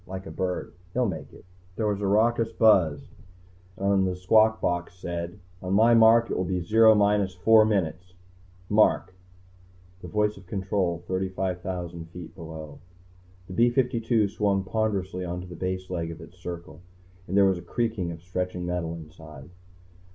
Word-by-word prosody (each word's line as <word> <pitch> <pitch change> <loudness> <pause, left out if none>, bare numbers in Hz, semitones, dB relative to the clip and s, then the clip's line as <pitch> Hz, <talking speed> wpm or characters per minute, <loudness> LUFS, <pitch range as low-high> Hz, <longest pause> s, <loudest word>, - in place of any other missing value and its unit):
Like 95 0 -7
a - - -8
bird. 90 -1 -3 0.2
He'll 125 0 +1
make 95 -7 -5
it." - - -16 0.3
There 110 - -2
was 105 -1 -1
a 100 - 0
raucous 115 +3 +2
buzz, 90 -10 +3 0.7
and 100 -1 +2
a 90 - -2
squawk 110 +4 +3
box 90 0 -2
said: 85 0 -5 0.2
"On 95 +1 -1
my 115 +3 +5
mark 115 0 +6
it - - -1
will 95 - 0
be 90 0 -1
Zero 110 +5 +5
minus 100 -2 +2
four 110 +4 +5
minutes... 90 -3 -2 0.5
mark!" 105 -2 +3 0.9
The - - -8
voice 105 0 0
of 90 - -15
Control, 95 -3 -2
35,000 90 -2 -3
feet 90 -1 -10
below. 80 -2 -9 0.7
The 90 - -9
B 120 +6 +4
52 120 -4 +1
swung 100 -1 0
ponderously 95 -3 -2
onto 90 0 -5
the 90 -1 -10
base 95 0 -3
leg 85 -2 -2
of 85 - -8
its 90 +2 -14
circle, 85 -1 -8 0.5
and 95 - -1
there 100 - +6
was 95 -2 +2
a - - -10
creaking 100 -1 -2
of 85 0 -10
stretching 90 0 -3
metal 90 -2 -3
inside. 80 -2 -12
95 Hz, 165 wpm, -26 LUFS, 90-105 Hz, 0.9 s, mark